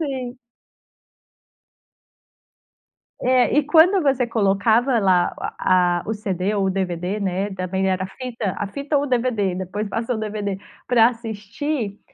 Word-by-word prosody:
sim. 260 -3 -4 2.8
É, 255 0 +3
e 300 - +5
quando 335 +5 +5
você 265 -3 +2
colocava 225 +3 +2
lá 185 -3 +3
o - - -10 0.2
a 180 -1 +2
o 220 - -1
CD 200 -1 -2
ou 195 -2 +1
DVD, 185 +1 -2
né, 195 +1 -1
também 190 +1 -2
era 185 0 0
a - - -4
fita, 230 -2 -5
a 205 - -2
fita 280 +7 -2
ou 285 - -1
DVD, 235 -7 0
depois 190 +3 -4
passou 230 +2 -2
o - - -5
DVD, 210 -2 -3 0.3
pra 235 -2 +6
assistir 225 +1 -4
215 Hz, 140 wpm, -22 LUFS, 190-250 Hz, 2.8 s, pra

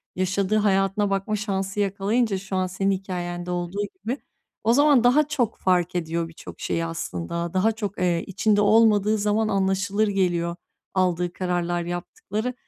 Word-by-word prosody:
yaşadığı 185 +3 +1
hayatına 195 0 +2
bakma 195 +2 -1
şansı 195 -1 -2
yakalayınca 200 +2 +1
şu 190 0 -5
an 185 0 +1
senin 195 +2 0
hikâyende 180 -2 -4
olduğu 175 +3 -2 0.2
gibi, 250 +5 -2 0.5
o 230 +2 +4
zaman 285 -3 +5
daha 280 +5 +4
çok 260 -7 -1
fark 180 -1 +1
ediyor 165 0 -1
birçok 165 - -11
şeyi 165 0 -1
aslında, 165 - -4
daha 200 +4 +3
çok, 210 -2 -5
eee, 175 -2 +1
içinde 205 +2 +2
olmadığı 215 0 +4
zaman 210 +1 +1
anlaşılır 195 +2 +1
geliyor 175 -3 0 0.4
aldığı 180 -2 +1
kararlar, 175 -1 -1
yaptıkları. 200 +7 -4
195 Hz, 145 wpm, -24 LUFS, 175-210 Hz, 0.5 s, zaman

